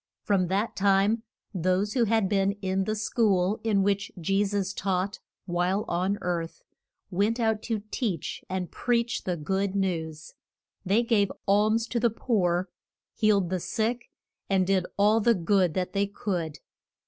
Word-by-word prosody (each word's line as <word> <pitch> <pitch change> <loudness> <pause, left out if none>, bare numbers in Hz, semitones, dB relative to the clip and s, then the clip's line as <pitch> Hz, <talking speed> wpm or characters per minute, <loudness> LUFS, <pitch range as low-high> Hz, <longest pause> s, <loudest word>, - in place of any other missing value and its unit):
From 190 -3 +2
that 200 +5 -1
time 200 +3 +3 0.3
those 185 +3 0
who 245 -3 +3
had 220 -2 +2
been 195 0 +2
in 190 -1 -1
the 215 - -1
school 210 -3 +1
in 205 -3 +2
which 200 0 0
Je 195 +4 +1
sus 200 -1 -1
taught 195 +3 -1 0.3
while 180 +3 0
on 185 +4 0
earth 170 -2 -3 0.5
went 205 +6 +1
out 220 -2 +1
to 220 -3 -3
teach 200 - -3
and 185 -2 -3
preach 235 -1 0
the 180 -2 -1
good 190 +5 -1
news. 160 -5 -2 0.5
They 205 +5 +2
gave 215 -4 +2 0.2
alms 215 +3 +3
to 240 - 0
the 235 0 +3
poor, 185 -6 0 0.5
healed 200 -5 +2
the 185 - 0
sick, 230 +6 -2 0.4
and 190 -1 +3
did 190 -1 +1
all 210 +2 +4
the 230 +1 +3
good 180 -1 +2
that 185 0 -2
they 200 0 +1
could. 175 -7 -3
195 Hz, 155 wpm, -27 LUFS, 185-215 Hz, 0.5 s, all